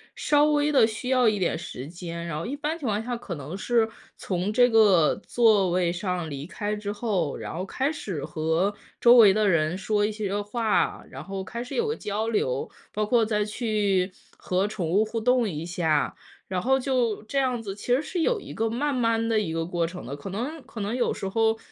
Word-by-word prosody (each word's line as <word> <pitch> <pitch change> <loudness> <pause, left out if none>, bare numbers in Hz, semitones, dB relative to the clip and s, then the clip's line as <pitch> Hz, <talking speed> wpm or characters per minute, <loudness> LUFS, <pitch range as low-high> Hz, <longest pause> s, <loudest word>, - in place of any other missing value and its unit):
稍 295 0 +3
微 300 0 +2
地 275 -6 +6
需 220 +3 -4
要 255 -2 +4
一 210 -1 -1
点 180 - 0
时 135 -5 -7
间。 170 0 -6
然 160 -3 -3
后 155 - -4
一 260 +5 -3
般 310 +2 -2
情 300 - -8
况 210 0 0
下 245 0 -3
可 215 -6 -6
能 150 +5 -7
是 225 +2 +1 0.3
从 185 +2 -2
这 245 +2 +5
个 205 -8 +5
座 215 -6 +4
位 175 -1 +2
上 180 -2 -3
离 140 -1 -6
开 205 +5 -3
之 210 -1 -4
后， 205 - -1
然 - - -6
后 180 +3 -3
开 265 +8 -1
始 190 - -5
和 160 +5 0 0.3
周 240 0 +7
围 215 -5 +8
的 215 0 +2
人 160 -1 +2
说 205 +2 +1
一 215 - -1
些 205 -1 -2
话， 215 +1 0
然 135 +2 -8
后 195 +2 -5
开 235 +5 -5
始 245 - -9
有 465 -1 +1
个 445 - -1
交 210 - -3
流。 140 - -1 0.2
包 215 - 0
括 230 +1 +3
再 210 -1 +1
去， 205 -4 0 0.3
和 185 +2 0
宠 195 -5 -3
物 200 +6 +3
互 225 +1 -3
动 250 -2 +3
一 155 0 -5
下， 165 -4 0 0.4
然 185 -1 -1
后 265 +5 +3
就 250 -5 0
这 275 +6 -1
样 250 -3 0
子， 195 -3 -4
其 225 +4 -1
实 270 - +1
是 350 +3 -4
有 465 +4 +1
一 - - -9
个 225 0 0
慢 280 +6 -1
慢 230 -2 +1
的 225 -1 +3
一 175 -6 -2
个 165 0 -1
过 170 -1 -1
程 180 +2 -8
的。 140 +3 -6
可 145 - -7
能 265 - -4
可 240 -4 -8
能 205 +3 -2
有 250 - +1
时 195 - -4
候 225 +2 +2
210 Hz, 245 characters per minute, -26 LUFS, 180-240 Hz, 0.4 s, 围